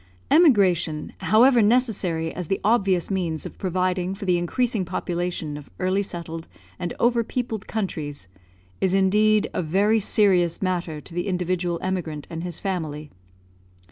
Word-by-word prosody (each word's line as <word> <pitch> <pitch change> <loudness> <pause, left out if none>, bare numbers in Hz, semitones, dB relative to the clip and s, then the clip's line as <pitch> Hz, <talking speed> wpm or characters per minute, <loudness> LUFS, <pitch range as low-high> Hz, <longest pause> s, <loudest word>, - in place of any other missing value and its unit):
Emigration, 190 - +3
however 240 +3 +5
necessary 205 -8 +1
as 180 -2 -5
the 195 - 0
obvious 200 -5 +2
means 170 -5 -2
of - - -9
providing 185 0 -1
for 200 0 -7
the 180 -2 +2
increasing 225 +4 0
population 175 -4 -3
of 145 - -11
early 185 +2 +1
settled 165 -4 -6 0.3
and 175 -2 -3
over 235 0 +3
peopled 230 -3 -4
countries, 150 - -4 0.5
is 190 0 +1
indeed 210 +2 +3
a - - -1
very 200 +7 +2
serious 190 -5 +2
matter 175 -5 -2
to - - -14
the 175 +3 -2
individual 180 -1 -1
emigrant 170 -6 -3
and 165 0 -5
his 175 -2 -3
family. 155 -6 -4
185 Hz, 140 wpm, -24 LUFS, 170-205 Hz, 0.5 s, however